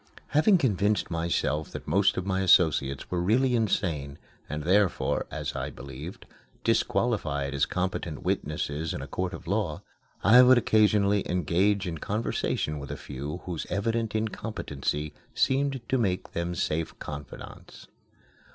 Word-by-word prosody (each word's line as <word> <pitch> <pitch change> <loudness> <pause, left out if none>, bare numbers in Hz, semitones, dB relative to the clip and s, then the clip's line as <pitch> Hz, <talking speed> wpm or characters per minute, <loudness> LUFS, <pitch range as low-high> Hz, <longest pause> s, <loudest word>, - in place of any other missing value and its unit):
Having 185 +7 +5
convinced 105 - +1
myself 80 -2 -1
that - - -8
most 95 +6 +3
of 95 - -2
my 95 -1 0
associates 75 -7 +3
were 90 -1 0
really 125 +8 +3
insane, 80 -10 -1 0.3
and 75 +1 -4
therefore 95 +3 +2
(as - - -4
I - - -3
believed) 70 +6 -9 0.4
disqualified 80 - 0
as 70 +1 +1
competent 90 -2 -3
witnesses 75 -4 -2
in - - -5
a - - -7
court 90 -1 -2
of - - -9
law, 95 -4 -1 0.4
I 115 +6 +8
would 125 0 +7
occasionally 105 -3 +3
engage 90 +3 +1
in 80 -3 -4
conversation 100 -7 -1
with 70 - -8
a - - -4
few 70 +5 -6
whose 85 -3 -4
evident 115 +2 -1
incompetency 75 -9 -3 0.2
seemed 135 -1 +1
to 130 - +1
make 95 -5 -1
them 85 +1 -2
safe 80 0 -2
confidants. 70 -1 -9
90 Hz, 140 wpm, -27 LUFS, 75-105 Hz, 0.4 s, I